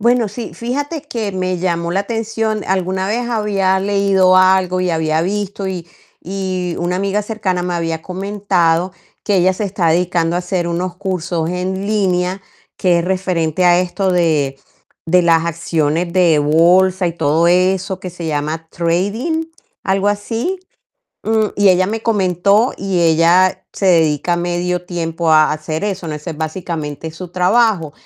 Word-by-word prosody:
Bueno, 235 0 +2
sí, 230 +4 -7
fíjate 285 +6 -3
que 230 -8 -4
me 185 -1 -1
llamó 170 -1 -1
la 190 +3 +1
atención. 225 0 -2
Alguna 190 0 -1
vez 235 +3 -1
había 200 -4 +1
leído 195 -2 +3
algo 185 -1 +3
y 180 - 0
había 160 -1 0
visto 200 +1 -3
y 180 -3 -4 0.4
y 185 -2 -3
una 175 +1 -1
amiga 200 +2 -1
cercana 195 -4 -2
me 180 0 -2
había 165 -1 -2
comentado 185 -3 0 0.3
que 205 -2 +1
ella 185 +1 +3
se 185 - -5
está 195 -3 -1
dedicando 170 0 +1
a 175 - 0
hacer 180 -1 -2
unos 175 +1 -3
cursos 180 -4 -2
en 185 +2 -3
línea, 190 -2 0 0.3
que 180 -2 +2
es 170 - -1
referente 180 -3 0
a 175 0 +5
esto 185 +1 -1
de 155 -6 +1 0.5
de 180 +2 +4
las 165 -1 +3
acciones 165 0 -1
de 170 -4 +4
bolsa 180 +5 +3
y 170 - -1
todo 160 0 +1
eso 185 +2 +2
que 185 - -6
se 170 -1 -7
llama 155 +2 -3
trading, 205 - -1 0.4
algo 195 +1 +1
así. 225 - -2 0.7
Mm, 220 0 +2
y 205 -1 +4
ella 185 0 +4
me 220 +1 -3
comentó 200 +1 +2
y 190 -2 -1
ella 170 +3 +3
se 195 - -2
dedica 165 -1 +3
medio 175 0 -2
tiempo 165 -2 -2
a 155 -1 +5
hacer 155 +1 -4
eso, 195 -4 -3
¿no? 155 - -4
Ese 150 +3 -6
es 160 - -7
básicamente 160 -2 -4
su 175 +3 -9
trabajo. 185 -3 +2
185 Hz, 160 wpm, -17 LUFS, 170-195 Hz, 0.7 s, a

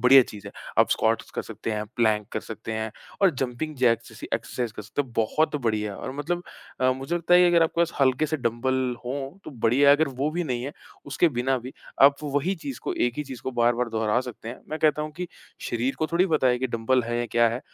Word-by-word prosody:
बढ़िया 130 +1 +8
चीज़ 105 -3 -10
है। - - -6 0.3
आप - - +5
स्क्वाट्स - - +1
कर - - -3
सकते - - -6
हैं, 105 0 -2
प्लैंक 110 -3 +2
कर - - -1
सकते 110 0 -7
हैं 110 0 -2 0.3
और 190 - +7
जंपिंग 135 +5 -3
जैक्स 120 -3 +2
जैसी - - -9
एक्सरसाइज़ 120 -3 -3
कर 105 - -8
सकते 115 +8 -2
हैं। 125 -4 -15
बहुत 150 +8 +1
बढ़िया 105 -2 0
और 130 - -5
मतलब 175 +4 -2 0.4
अ, 130 0 +4
मुझे 135 +6 -4
लगता 175 +1 +3
है 180 - +8
कि 180 - +6
अगर 170 -1 +5
आपके 165 +1 +1
पास 170 0 +2
हल्के 135 +3 +3
से 155 +1 -1
डम्बल 125 +1 0
हों 135 +6 -4
तो - - -7
बढ़िया 125 +2 +3
है। 145 - +7
अगर 160 -1 +2
वो 140 +4 0
भी 175 +2 -2
नहीं 125 -5 -2
है, 145 - -5 0.3
उसके 165 +4 +3
बिना 130 +2 +2
भी 125 +2 -9 0.3
आप 140 0 +8
वही 145 +6 0
चीज़ 135 -3 -5
को - - -2
एक 120 0 +1
ही 150 - -1
चीज़ 130 -4 -9
को - - -2
बार-बार 120 +1 +2
दोहरा 110 +1 +1
सकते 115 -1 -8
हैं। 120 - -7
मैं 155 - -4
कहता 150 -1 +2
हूँ 155 0 -5
कि 180 -1 -4 0.4
शरीर 120 +3 0
को 155 - +1
थोड़ी 180 +3 +4
पता 155 -6 +2
है 125 -1 +3
कि 130 - 0
डम्बल 120 +2 +1
है 120 0 -2
या 120 - -1
क्या 120 0 +6
है। 120 +3 -3
130 Hz, 250 wpm, -25 LUFS, 120-150 Hz, 0.4 s, बढ़िया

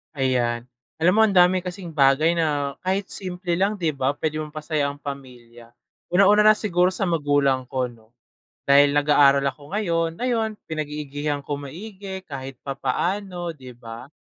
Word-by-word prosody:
Ayan, 125 -3 0 0.4
alam 180 +3 +4
mo - - +6
ang 200 -3 -1
dami 180 +1 +5
kasing 180 -1 -7
bagay 145 +2 +4
na 145 -4 -1
kahit 190 +1 -1
simple 180 -1 -4
lang, 200 +2 +1
'di 170 -6 -1
ba 140 0 -1
pwedeng 155 0 -3
mapasaya 150 -1 -2
ang 140 0 -6
pamilya? 120 -4 -10 0.3
Unang-una 205 +3 +5
na 215 - +7
siguro 180 -4 +2
sa 195 - -1
magulang 145 -6 +1
ko 130 -1 -2
no 115 0 -22 0.5
dahil 140 +1 +6
nag-aaral 145 -1 +4
ako 145 +3 -10
ngayon. 165 -5 -1
Ayon 235 -3 0 0.2
pinag-iigihan 150 -1 -3
ko 145 +1 -4
maigi 190 +7 -8
kahit 135 -3 -7
papaano, 175 +5 -3
'di 130 -3 -11
ba? 120 +2 -11
150 Hz, 150 wpm, -23 LUFS, 140-180 Hz, 0.5 s, na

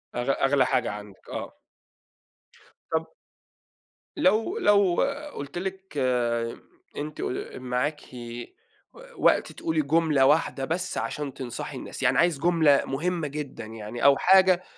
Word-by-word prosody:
أغ 120 +2 -2 0.2
أغلى 135 -1 +3
حاجة 125 -3 0
عندِك 105 -1 -11
آه. - - -6 1.3
طب 160 0 -2 1.0
لو 280 - +2
لو 200 - +4 0.4
قلت 140 +4 -6
لِك، 190 -3 -6 1.0
أنتِ 150 +1 -5
ق - - -4
معاكِ 130 +4 -2 0.9
و - - -18 0.2
وقت - - +3
تقولي 160 -1 -1
جملة 150 -2 +3
واحدة 145 -2 +2
بس 170 +5 -2
عشان 145 -3 -3
تنصحي 125 -3 -6
الناس، - - -7
يعني - - +3
عايز 170 -4 +3
جملة 160 -3 +4
مهمة 165 +3 -2
جدًا 140 -5 -6
يعني 110 +1 -7
أو 140 -1 +7
حاجة 185 -1 +5
150 Hz, 120 wpm, -26 LUFS, 135-175 Hz, 1.3 s, أو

